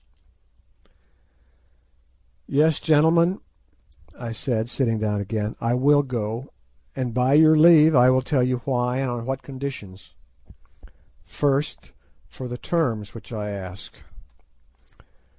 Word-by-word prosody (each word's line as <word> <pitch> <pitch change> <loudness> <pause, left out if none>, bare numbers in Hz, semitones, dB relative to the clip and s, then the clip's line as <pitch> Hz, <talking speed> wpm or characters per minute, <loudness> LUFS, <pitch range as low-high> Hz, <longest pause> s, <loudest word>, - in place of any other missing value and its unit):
"Yes, 150 +2 +2
gentlemen," 165 +4 +3 0.8
I 120 -2 -6
said, 115 -1 -2
sitting 120 -2 -1
down 105 -1 -2
again, 105 +1 -4
"I 115 +1 0
will 145 +3 +4
go, 120 -1 -5 0.5
and 125 -3 -3
by 125 +2 +1
your 155 +1 +6
leave 160 0 +6
I 125 0 +6
will 130 0 +2
tell 135 0 0
you 125 -1 -1
why, 125 -1 -1
and 135 -2 -2
on 120 0 -5
what 135 0 -4
conditions. 130 -9 -8 1.1
First 145 +1 -2 0.3
for 130 - -9
the 125 0 -6
terms 120 - -2
which 115 - -12
I 105 -2 -4
ask. 95 -1 -9
125 Hz, 115 wpm, -23 LUFS, 115-145 Hz, 1.1 s, your